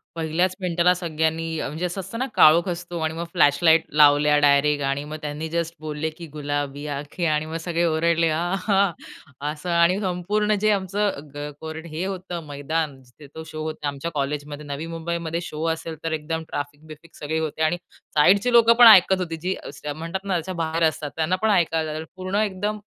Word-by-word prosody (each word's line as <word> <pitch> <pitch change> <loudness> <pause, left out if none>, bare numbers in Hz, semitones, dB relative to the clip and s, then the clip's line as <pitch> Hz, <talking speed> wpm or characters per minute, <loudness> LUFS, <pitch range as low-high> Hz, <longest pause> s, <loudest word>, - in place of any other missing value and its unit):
पहिल्याच 165 +3 0
मिनिटाला 180 0 +3
सगळ्यांनी 160 -1 -1
अ, - - -2
म्हणजे 155 +6 -4
असं 180 +2 -4
असतं 190 +5 -8
ना, 260 - 0
काळोख 165 +4 +6
असतो 175 0 -5
आणि 160 0 -1
मग 165 +1 -4
फ्लॅशलाईट 160 +3 +4 0.2
लावल्या 150 0 +6
डायरेक्ट. 145 0 +3
आणि 140 +1 -1
मग 155 +1 -6
त्यांनी 150 +2 -4
जस्ट 170 0 -2
बोलले, 155 0 -3
की 165 +1 -10
गुलाबी 145 -1 -4
आँखें 150 +5 -4
आणि 150 +1 0
मग 160 +1 -6
सगळे 170 0 0
ओरडले 165 0 +2
आहां! 195 +4 +1 0.6
असं. 155 +3 -7
आणि 170 +3 +3
संपूर्ण 205 +3 0
जे 215 0 +3
आमचं 195 -6 -1
ग 145 0 -5
कोरडं 160 +1 -7
हे 155 +3 -4
होतं 180 -3 -5
मैदान 145 -1 -3
जिथे 130 +4 -16
तो 160 - -6
शो 155 0 -6
होता, 155 -2 -4
आमच्या 145 +4 -4
कॉलेजमध्ये, 145 +1 -3
नवी 145 +2 -5
मुंबईमध्ये 170 0 -3
शो 155 0 -6
असेल 160 0 -7
तर 165 - -2
एकदम 160 +1 -3
ट्रॅफिक-बिफिक 150 +3 -8
सगळे 160 +2 -3
होते. 155 0 -3
आणि 160 +3 +2 0.4
साईडचे 200 +10 +4
लोकंपण 235 0 +7
ऐकत 190 -2 +7
होती 165 -3 -3
जी 185 +2 -1
असं 145 +1 -6
म्हणतात 165 +4 -5
ना, 195 - -1
त्याच्या 175 +2 -2
बाहेर 165 +1 -1
असतात, 150 -2 -4
त्यांना 160 +3 +1
पण 220 - +2
ऐकायला 165 -5 +1
जाईल, 160 +1 -5
पूर्ण 185 +1 -4
एकदम 205 +1 -2
160 Hz, 185 wpm, -23 LUFS, 150-180 Hz, 0.6 s, लोकंपण